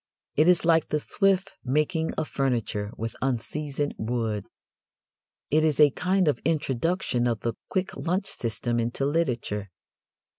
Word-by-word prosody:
It 155 +3 +4
is 180 -2 +4
like 165 -2 +4
the 150 - +1
swift 195 +4 +1
making 150 +5 +1
of 155 - -1
furniture 115 -6 -1
with 115 +1 -4
unseasoned 140 +3 -1
wood. 110 -3 -2 1.0
It 155 +2 +4
is 155 -3 +2
a 150 -2 +7
kind 185 +4 +1
of 150 - +2
introduction 145 -3 0
of 115 -3 -1
the 115 - -1 0.2
quick 185 -1 -1
lunch 185 +4 -1
system 120 - -2
into 120 +4 -1
literature. 125 -10 -1
145 Hz, 140 wpm, -26 LUFS, 120-165 Hz, 1.0 s, a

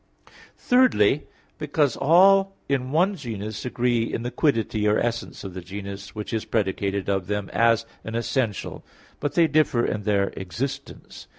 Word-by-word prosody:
Thirdly, 150 - +3 0.3
because 150 -3 +1
all 195 +6 +5
in 130 -2 -1
one 180 +6 +2
genus 110 - -6
agree 120 -2 0
in 115 - -3
the 125 - -3
quiddity 115 - +1
or 105 - +3
essence 120 0 -3
of 95 -2 -7
the 95 - -6
genus 100 +2 -8
which 105 +2 -5
is 110 - -1
predicated 100 -2 -1
of 95 -3 -1
them 105 -1 -3
as 115 0 +3 0.2
an 110 - -6
essential, 115 -2 -2 0.4
but 145 - -3
they 170 - +5
differ 155 -6 +2
in 105 - -2
their 100 -1 +1
existence. 115 +9 -6
115 Hz, 155 wpm, -24 LUFS, 100-140 Hz, 0.4 s, all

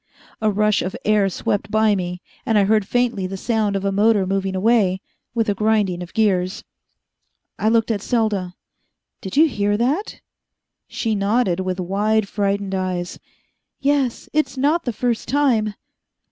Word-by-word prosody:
A 215 - +3
rush 210 0 +2
of 185 +2 -4
air 210 -2 +3
swept 200 +2 -2
by 215 0 +3
me, 180 -2 -3 0.2
and 225 - +1
I 205 - +5
heard 210 0 +2
faintly 240 -6 0
the 195 +1 -6
sound 215 -1 0
of 195 0 -2
a 195 - +1
motor 205 0 +3
moving 195 0 -1
away, 195 -2 +2 0.4
with 225 -1 +1
a 205 - +2
grinding 205 -3 +1
of 175 - -9
gears. 190 -4 +1 1.0
I 215 - +2
looked 230 0 +2
at 205 -3 -1
Selda. 205 -7 -1 0.7
"Did 190 +7 -6
you 320 +2 +7
hear 205 -6 0
that?" 280 - -1 0.7
She 225 -2 -2
nodded, 200 -2 +1
with 185 0 -2
wide, 205 +3 +1
frightened 200 -1 -1
eyes. 185 -2 -3 0.6
"Yes. 275 -3 0
It's 305 -2 0
not 300 +6 +1
the 245 - -1
first 235 +1 -1
time." 230 -6 +1
210 Hz, 160 wpm, -21 LUFS, 195-230 Hz, 1.0 s, you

